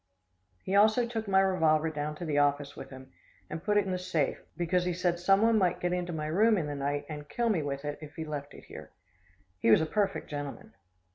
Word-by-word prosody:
He 190 Hz, -, -1 dB
also 215 Hz, +4 st, +5 dB
took 225 Hz, -2 st, -4 dB
my 190 Hz, -1 st, +4 dB
revolver 160 Hz, -4 st, +2 dB
down 150 Hz, 0 st, -4 dB
to 170 Hz, -, -6 dB
the 145 Hz, -2 st, +1 dB
office 145 Hz, 0 st, +1 dB
with -, -, -9 dB
him 130 Hz, 0 st, -12 dB, 0.4 s
and 160 Hz, +1 st, -5 dB
put 210 Hz, +1 st, +2 dB
it 205 Hz, -, +3 dB
in 190 Hz, -, -3 dB
the 185 Hz, -, -1 dB
safe, 175 Hz, -6 st, -1 dB, 0.2 s
because 175 Hz, +1 st, +1 dB
he 180 Hz, -, 0 dB
said 175 Hz, 0 st, 0 dB
someone 205 Hz, +5 st, +4 dB
might 180 Hz, -3 st, +1 dB
get 180 Hz, 0 st, -1 dB
into 180 Hz, -1 st, -2 dB
my 155 Hz, -2 st, -3 dB
room 210 Hz, +8 st, +3 dB
in 165 Hz, -, -1 dB
the 145 Hz, -, -4 dB
night 145 Hz, +1 st, -2 dB
and 150 Hz, -2 st, -8 dB
kill 235 Hz, -1 st, 0 dB
me 190 Hz, -7 st, +1 dB
with 140 Hz, 0 st, -4 dB
it 145 Hz, 0 st, -4 dB
if 150 Hz, -1 st, -10 dB
he 160 Hz, -, -5 dB
left 145 Hz, -2 st, -6 dB
it -, -, -13 dB
here. -, -, -10 dB, 0.7 s
He 115 Hz, -, +2 dB
was 110 Hz, -, +7 dB
a -, -, +1 dB
perfect 200 Hz, +3 st, -1 dB
gentleman. 145 Hz, -1 st, -7 dB
165 Hz, 235 wpm, -29 LUFS, 145-190 Hz, 0.7 s, was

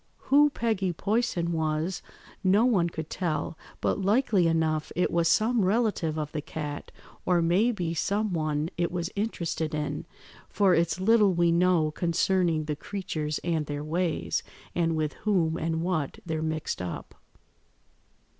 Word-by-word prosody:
Who 295 Hz, +2 st, +6 dB
Peggy 215 Hz, -9 st, -1 dB
Poyson 195 Hz, -3 st, 0 dB
was 160 Hz, +2 st, -1 dB, 0.4 s
no 200 Hz, +5 st, +4 dB
one 190 Hz, -9 st, +3 dB
could 160 Hz, -2 st, -6 dB
tell, 155 Hz, -4 st, -2 dB, 0.3 s
but -, -, 0 dB
likely 200 Hz, -3 st, +3 dB
enough 160 Hz, -1 st, 0 dB
it 180 Hz, -, +1 dB
was 170 Hz, -1 st, +2 dB
some 220 Hz, +5 st, +3 dB
relative 195 Hz, -6 st, +1 dB
of 150 Hz, -1 st, -3 dB
the 150 Hz, -, -3 dB
cat, 145 Hz, -1 st, -6 dB, 0.3 s
or 180 Hz, -1 st, +2 dB
may 180 Hz, +8 st, +3 dB
be 175 Hz, -7 st, -2 dB
some 200 Hz, +4 st, 0 dB
one 155 Hz, -1 st, -1 dB
it 170 Hz, -, +1 dB
was 175 Hz, -1 st, -3 dB
interested 170 Hz, -7 st, -2 dB
in, 150 Hz, +1 st, -3 dB, 0.4 s
for 195 Hz, -3 st, +3 dB
it's 165 Hz, 0 st, +1 dB
little 205 Hz, -1 st, +4 dB
we 170 Hz, 0 st, +3 dB
know 170 Hz, -2 st, +3 dB
concerning 170 Hz, 0 st, +1 dB
the 150 Hz, -1 st, -2 dB
creatures 155 Hz, -4 st, -4 dB
and 160 Hz, -3 st, -1 dB
their 145 Hz, 0 st, -4 dB
ways, 165 Hz, +2 st, -1 dB, 0.3 s
and 165 Hz, -2 st, +1 dB
with 155 Hz, -1 st, -1 dB
whom 175 Hz, -7 st, +1 dB
and 165 Hz, 0 st, -1 dB
what 160 Hz, -6 st, -1 dB
they're 160 Hz, -2 st, -2 dB
mixed 155 Hz, -9 st, -2 dB
up." 90 Hz, -2 st, -6 dB
170 Hz, 150 wpm, -27 LUFS, 155-190 Hz, 0.4 s, Who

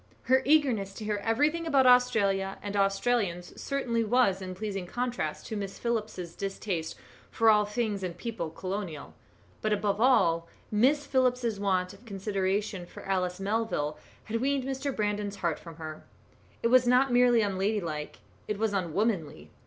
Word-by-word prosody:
Her 260 Hz, +1 st, +4 dB
eagerness 250 Hz, -10 st, +2 dB
to 215 Hz, -, -7 dB
hear 210 Hz, -1 st, 0 dB
everything 300 Hz, +9 st, +1 dB
about 275 Hz, -4 st, +4 dB
Australia 205 Hz, -6 st, +3 dB
and 205 Hz, 0 st, -4 dB
Australians 195 Hz, -3 st, 0 dB
certainly 250 Hz, -5 st, -1 dB
was 215 Hz, -4 st, +2 dB
in 185 Hz, -1 st, -6 dB
pleasing 195 Hz, -2 st, -4 dB
contrast 240 Hz, -9 st, -3 dB
to 220 Hz, -, -5 dB
Miss 200 Hz, -2 st, -4 dB
Phillips's 215 Hz, -7 st, -3 dB
distaste 195 Hz, -4 st, -3 dB, 0.3 s
for 225 Hz, -1 st, +4 dB
all 210 Hz, -1 st, +4 dB
things 210 Hz, -2 st, -2 dB
and 180 Hz, -2 st, -4 dB
people 220 Hz, -7 st, -4 dB
colonial; 185 Hz, -2 st, -5 dB, 0.5 s
but 215 Hz, -, 0 dB
above 205 Hz, 0 st, 0 dB
all, 170 Hz, -10 st, +4 dB, 0.2 s
Miss 270 Hz, +8 st, +3 dB
Phillips's 250 Hz, -5 st, +1 dB
want 185 Hz, -2 st, 0 dB
of 200 Hz, +4 st, -16 dB
consideration 195 Hz, -2 st, -2 dB
for -, -, -11 dB
Alice 185 Hz, -1 st, -1 dB
Melville 195 Hz, -7 st, -1 dB, 0.2 s
had 225 Hz, +1 st, -3 dB
weaned 275 Hz, 0 st, +1 dB
Mr. 270 Hz, +1 st, -2 dB
Brandon's 205 Hz, -1 st, -1 dB
heart 170 Hz, -5 st, -1 dB
from 165 Hz, -2 st, -11 dB
her. 155 Hz, -1 st, -8 dB, 0.6 s
It 230 Hz, -, +3 dB
was 255 Hz, 0 st, +5 dB
not 250 Hz, +1 st, +4 dB
merely 245 Hz, -1 st, +5 dB
unladylike; 190 Hz, -6 st, -2 dB, 0.3 s
it 210 Hz, -, -2 dB
was 220 Hz, 0 st, 0 dB
unwomanly. 170 Hz, -, -1 dB
210 Hz, 155 wpm, -29 LUFS, 190-240 Hz, 0.6 s, was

